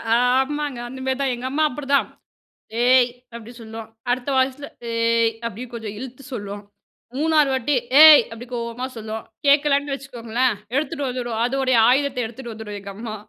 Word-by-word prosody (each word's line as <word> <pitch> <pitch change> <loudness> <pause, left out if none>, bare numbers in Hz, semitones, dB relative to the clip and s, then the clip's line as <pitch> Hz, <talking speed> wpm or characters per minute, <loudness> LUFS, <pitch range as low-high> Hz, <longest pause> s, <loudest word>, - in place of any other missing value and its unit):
ஆமாங்க. 265 +2 +1
அந்த 260 +1 -9
மாதிரி 265 +1 -1
தா, - - +1
எங்க 245 +2 -7
அம்மா 310 +2 +1
அப்படிதான். 280 +1 0 0.8
ஏய் 255 -1 +5 0.3
அப்படி 230 0 -9
சொல்லும் 225 0 -8 0.2
அடுத்த 250 +2 -2
வாய்ஸில 265 +2 0 0.3
ஏய் 230 0 +2
அப்படின்னு 235 +2 -6
கொஞ்சம் 220 -3 -6
இழுத்து 260 +1 -9
சொல்லும் 205 -2 -6 0.6
3வறு 305 -2 +3
வாட்டி 265 +3 0 0.3
ஏய் 310 -1 +10
அப்படி 230 +2 -8
கோவமா 235 +1 -4
சொல்லும் 220 0 -6 0.2
கேட்கலன்னு 285 0 +3
வச்சுக்கோங்களேன், 245 -3 -2 0.2
எடுத்துட்டு 290 -1 -1
வந்துடும் 240 -3 -3
அதனுடைய 255 -1 +1
ஆயுதத்த 270 0 +1
எடுத்துட்டு 235 +1 -8
வந்துடும், 215 -2 -7
எங்க 200 0 -9
அம்மா. 220 0 -6
250 Hz, 150 wpm, -22 LUFS, 230-275 Hz, 0.8 s, ஏய்